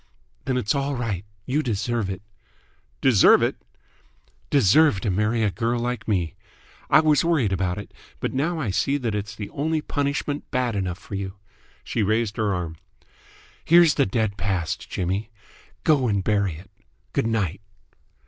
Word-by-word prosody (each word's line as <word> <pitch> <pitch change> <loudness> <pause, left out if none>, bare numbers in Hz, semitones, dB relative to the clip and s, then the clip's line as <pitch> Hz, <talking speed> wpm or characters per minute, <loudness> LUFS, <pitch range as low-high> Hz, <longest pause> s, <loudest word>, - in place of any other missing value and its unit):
"Then 130 - 0
it's 110 -4 +1
all 140 0 -1
right. 105 -6 -3 0.2
You 145 +4 +1
deserve 115 -3 -1
it!" 95 +1 -5 0.8
"Deserve 120 -8 +6
it?" - - 0 0.9
"Deserve 140 -1 +5
to 105 - 0
marry 105 +4 +1
a 105 - +2
girl 120 +3 -1
like 125 +1 -3
me. 90 -7 0 0.6
I - - +7
was 155 -1 +3
worried 150 - +2
about 90 0 -1
it, 105 - -8 0.3
but - - -2
now 160 +5 0
I 115 -10 -1
see 135 +8 +1
that 120 -6 -2
it's 105 +1 -4
the 105 -2 -7
only 155 +2 0
punishment 145 0 -2
bad 125 -4 0
enough 90 -3 -2
for - - -12
you!" 95 0 -4 0.5
She 115 - -2
raised 110 +1 0
her 110 -3 +1
arm. 85 -3 -3 0.9
"Here's 170 -2 +6
the - - +2
dead 105 0 -1
past, 90 -3 -2
Jimmy! 95 +4 -2 0.5
Go 140 -5 +3
and 100 -3 0
bury 100 -4 +1
it! 85 +5 -13 0.4
Good - - +1
night!" 100 -5 -1
110 Hz, 160 wpm, -24 LUFS, 95-135 Hz, 0.9 s, I